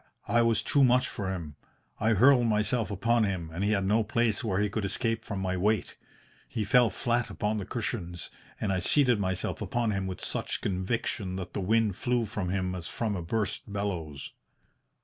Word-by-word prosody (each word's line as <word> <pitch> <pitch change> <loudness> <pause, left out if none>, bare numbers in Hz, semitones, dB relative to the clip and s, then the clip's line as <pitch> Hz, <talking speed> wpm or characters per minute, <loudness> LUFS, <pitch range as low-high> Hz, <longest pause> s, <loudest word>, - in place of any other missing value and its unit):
I 120 - +3
was 115 -2 +2
too 140 - +3
much 125 0 +4
for 95 -2 -4
him. 80 -6 -6 0.4
I 110 +1 +3
hurled 120 +3 +5
myself 105 0 +1
upon 115 +3 +2
him, 90 -6 -2
and 90 +4 -2
he 100 - +2
had 100 -2 +1
no 110 +3 +3
place 115 +1 +1
where 100 -4 0
he 105 - +2
could 105 +1 -3
escape 115 +3 0
from 100 -4 -4
my 95 -1 -1
weight. 105 +2 0 0.5
He 110 - -2
fell 120 +2 +4
flat 120 +3 0
upon 105 0 -1
the 100 - -6
cushions 95 -7 -4 0.3
and 100 -2 0
I 95 - +1
seated 125 - +3
myself 95 -1 -2
upon 120 -4 0
him 100 -2 -2
with 95 - -5
such - - -2
conviction 95 0 -2
that 95 -2 -6
the 100 - -2
wind 105 0 +2
flew 120 -1 +1
from 100 -3 -3
him 95 -1 -1
as 85 -3 -5
from 110 +1 -2
a 90 - -3
burst 105 +4 -2
bellows. 90 -8 -4
105 Hz, 195 wpm, -29 LUFS, 95-115 Hz, 0.5 s, hurled